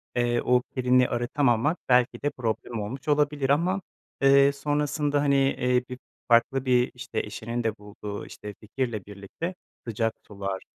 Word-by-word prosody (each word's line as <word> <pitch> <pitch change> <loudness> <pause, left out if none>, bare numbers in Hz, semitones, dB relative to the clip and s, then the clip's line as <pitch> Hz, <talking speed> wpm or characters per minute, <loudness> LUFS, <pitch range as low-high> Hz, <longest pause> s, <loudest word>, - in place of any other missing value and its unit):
eee, 120 -1 +1
o 125 0 +3
kirini 125 -1 +3
arıtamamak 125 +4 +1
belki 125 -1 +3
de 145 - +2
problem 115 -2 -3
olmuş 125 +8 -6
olabilir 145 -2 +1
ama, 180 +7 +2 0.4
eee, 140 0 +6
sonrasında 145 +1 0
hani, 140 -1 +3
eee, 125 -2 +2
bir 125 0 -7 0.3
farklı 120 +3 +3
bir 125 -1 +3
işte 125 +2 -4
eşinin 115 +3 -4
de 115 -1 -1
bulduğu 105 0 -7
işte 105 0 -9
fikirle 110 -2 -3
birlikte 105 - -6 0.3
sıcak 115 0 0
sular, 100 -1 -4
125 Hz, 145 wpm, -26 LUFS, 115-140 Hz, 0.4 s, eee